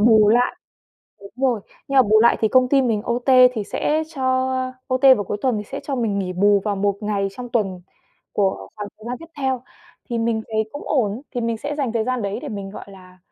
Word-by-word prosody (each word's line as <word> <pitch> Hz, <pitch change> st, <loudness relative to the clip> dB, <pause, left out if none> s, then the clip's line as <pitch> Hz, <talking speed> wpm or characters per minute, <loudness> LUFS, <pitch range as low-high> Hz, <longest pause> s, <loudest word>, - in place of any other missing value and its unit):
bù 215 Hz, -1 st, +6 dB
lại 240 Hz, +3 st, +3 dB, 0.6 s
đúng 200 Hz, -, -12 dB
rồi, 255 Hz, -4 st, +1 dB, 0.3 s
nhưng 275 Hz, -, -1 dB
mà 265 Hz, -, +8 dB
bù 215 Hz, -1 st, +4 dB
lại 235 Hz, -, +5 dB
thì 220 Hz, -, +3 dB
công 255 Hz, +2 st, +4 dB
ty 275 Hz, 0 st, +4 dB
mình 225 Hz, -5 st, 0 dB
OT 240 Hz, +1 st, -3 dB, 0.3 s
thì 215 Hz, -3 st, -3 dB
sẽ 305 Hz, +9 st, 0 dB
cho 270 Hz, -, -5 dB, 0.7 s
OT 255 Hz, 0 st, -1 dB
vào 205 Hz, -, -3 dB
cuối 205 Hz, -, -3 dB
tuần 255 Hz, -4 st, +1 dB
thì -, -, -4 dB
sẽ 275 Hz, +7 st, -6 dB
cho 280 Hz, -, -2 dB
mình 220 Hz, -5 st, 0 dB
nghỉ 185 Hz, -2 st, -2 dB
bù 200 Hz, +2 st, +3 dB
vào 205 Hz, -2 st, -1 dB
một 200 Hz, 0 st, 0 dB
ngày 205 Hz, -2 st, -1 dB
trong 245 Hz, +4 st, -8 dB
tuần 200 Hz, -6 st, -1 dB, 0.5 s
của 195 Hz, -2 st, -1 dB
khoảng 205 Hz, -1 st, -5 dB
thời 215 Hz, -, -15 dB
gian 245 Hz, +1 st, -3 dB
tiếp 330 Hz, -, -11 dB
theo. 265 Hz, -3 st, -1 dB, 0.5 s
Thì 235 Hz, -, -1 dB
mình 225 Hz, -1 st, 0 dB
thấy 220 Hz, -1 st, 0 dB
cũng 290 Hz, -, -7 dB
ổn, 230 Hz, -3 st, 0 dB
thì 245 Hz, -, -1 dB
mình 230 Hz, -1 st, -1 dB
sẽ 290 Hz, +5 st, -4 dB
dành 270 Hz, -6 st, -1 dB
thời 225 Hz, -2 st, 0 dB
gian 255 Hz, -1 st, -1 dB
đấy 200 Hz, 0 st, -3 dB
để -, -, -5 dB
mình, 200 Hz, -2 st, -6 dB
gọi -, -, -9 dB
là, 185 Hz, -1 st, -16 dB
225 Hz, 240 wpm, -21 LUFS, 205-250 Hz, 0.7 s, mà